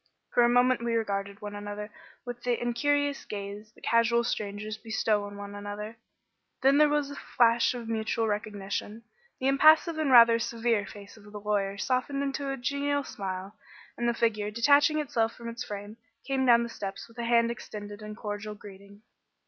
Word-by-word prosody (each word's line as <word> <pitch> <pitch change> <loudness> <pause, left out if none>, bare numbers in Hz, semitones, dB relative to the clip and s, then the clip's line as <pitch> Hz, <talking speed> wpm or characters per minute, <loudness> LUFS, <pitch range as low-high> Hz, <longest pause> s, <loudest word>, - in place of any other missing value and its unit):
For - - +3
a 240 - +5
moment 245 0 +3
we 235 -1 0
regarded 200 -2 -2
one 205 0 -5
another 205 +1 -6 0.3
with 245 -1 -6
the 245 -1 0
incurious 285 +4 0
gaze 205 +1 -7
that - - -22
casual 230 0 +3
strangers 210 -1 -3
bestow 220 -2 0
on 205 0 -9
one 200 0 -8
another; 205 +2 -6 0.7
then 275 +2 +5
there 300 0 +6
was 295 -1 0
a - - -7
flash 235 0 +2
of 235 -2 -6
mutual 225 0 -1
recognition; 210 +1 -4 0.4
the 260 - 0
impassive 310 +4 +5
and 305 -3 +1
rather 230 -2 +8
severe 230 -2 0
face 205 +1 -12
of 205 -1 -15
the 210 - -7
lawyer 200 -1 -1
softened 260 +5 -1
into 280 0 -2
a 270 - -3
genial 285 +2 -1
smile, 190 -3 -6 0.4
and 240 0 0
the 235 - 0
figure, 215 -3 0
detaching 285 +7 +4
itself 230 -6 0
from 235 - -9
its 235 +1 -5
frame, 205 +1 -7 0.3
came 265 -1 0
down 235 -1 +6
the 235 - -5
steps 195 -3 -6
with 230 +1 -15
a - - -2
hand 235 0 +3
extended 205 -2 -8
in 210 0 -7
cordial 210 -1 -5
greeting. 200 0 -14
230 Hz, 180 wpm, -28 LUFS, 205-245 Hz, 0.7 s, rather